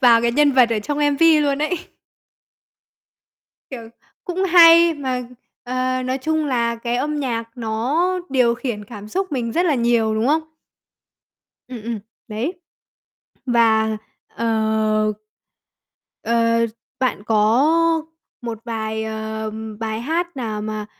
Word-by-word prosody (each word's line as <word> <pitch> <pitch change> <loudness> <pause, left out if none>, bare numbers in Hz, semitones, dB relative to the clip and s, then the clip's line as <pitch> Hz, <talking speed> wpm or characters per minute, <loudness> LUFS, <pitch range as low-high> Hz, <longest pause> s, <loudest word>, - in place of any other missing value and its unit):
vào 235 -3 +6
cái 235 0 +1
nhân 290 +1 +4
vật 255 -3 +4
ở 225 - +1
trong 290 +8 -3
MV 300 +2 +4
luôn 280 -1 0
ấy. 340 +3 -1 1.9
Kiểu, 235 -4 -8 0.4
cũng 370 +1 -2
hay 335 -2 +7
mà, 260 -4 -3 0.4
ờ, 255 +1 -1
nói 255 +1 -2
chung 315 +3 -1
là 235 -3 0
cái 235 +1 -2
âm 295 +4 -2
nhạc 235 -4 -2
nó 240 +9 0 0.2
điều 250 -3 +2
khiển 235 -4 -5
cảm 210 -1 -10
xúc 375 - -3
mình 235 -4 -2
rất 350 +7 +1
là 310 - +2
nhiều, 235 -3 +1
đúng 220 +2 0
không? 305 +4 +3 1.3
Ừm, 245 -4 -8
ừm, 230 0 -4 0.3
đấy. 255 - -4 0.9
Và, 220 -3 +3 0.3
ờ 220 -1 0 1.1
ờ, 230 0 +2 0.3
bạn 255 -6 -1
có 220 +5 +3 0.8
một 230 -2 -5
vài, 220 -1 -3
ờm, 220 0 -5
bài 220 0 -3
hát 335 +6 -2
nào 220 -4 -4
mà 215 -1 -4
235 Hz, 130 wpm, -20 LUFS, 220-285 Hz, 1.9 s, hay